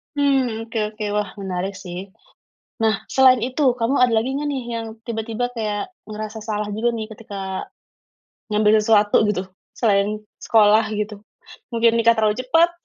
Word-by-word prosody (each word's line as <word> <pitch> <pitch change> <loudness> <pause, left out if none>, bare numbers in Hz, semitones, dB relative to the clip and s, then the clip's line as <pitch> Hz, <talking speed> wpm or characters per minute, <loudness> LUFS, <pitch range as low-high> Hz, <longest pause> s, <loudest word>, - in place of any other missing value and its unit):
Mmm, 260 -6 +1
oke 225 -1 -3
oke, 215 0 -7
wah 210 -2 0
menarik 190 0 -3
sih. 185 +1 -7 0.7
Nah 220 -2 +1
selain 255 -3 +5
itu, 260 +4 -4 0.2
kamu 250 +3 0
ada 250 -2 +4
lagi 225 +4 +1
gak 295 - -2
nih 275 -4 -2
yang 230 0 -3 0.2
tiba-tiba 225 +1 -3
kayak 215 - -3 0.2
ngerasa 215 +1 -6
salah 210 -1 -3
juga 230 +3 +1
nih 220 -1 -4
ketika 195 -3 -6 0.8
ngambil 210 0 +4
sesuatu 210 -1 +4
gitu, 190 -2 -2 0.3
selain 210 -1 +2 0.2
sekolah 215 0 +5 0.2
gitu? 210 -1 -4 0.5
Mungkin 230 0 +3
nikah 230 0 +4
terlalu 215 -1 +3
cepat? 330 +6 +4
220 Hz, 150 wpm, -21 LUFS, 210-235 Hz, 0.8 s, selain